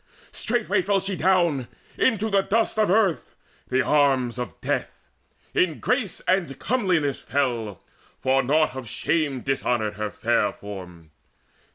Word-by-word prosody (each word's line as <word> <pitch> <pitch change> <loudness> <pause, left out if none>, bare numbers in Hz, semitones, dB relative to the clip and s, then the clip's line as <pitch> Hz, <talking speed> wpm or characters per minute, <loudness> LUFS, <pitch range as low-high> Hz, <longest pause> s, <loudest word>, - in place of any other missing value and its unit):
Straightway 215 -4 0
fell 195 +2 +1
she 195 0 -3
down 170 -8 +2 0.3
Into 220 -3 +1
the 195 0 +4
dust 220 +2 0
of 215 - +3
earth, 190 - +1 0.3
the 130 0 +2
arms 130 -3 +2
of 125 - -6
death, - - -3 0.5
In 165 -4 +1
grace 250 -6 -1
and 175 -8 0
comeliness 180 - 0
fell, 120 - -2 0.4
for 135 +1 +2
naught 150 +3 +2
of 130 -4 -6
shame 140 +2 -1
Dishonoured 120 -6 -1
her 105 0 -2
fair 90 - +1
form. 90 -6 -10
145 Hz, 135 wpm, -24 LUFS, 125-195 Hz, 0.5 s, the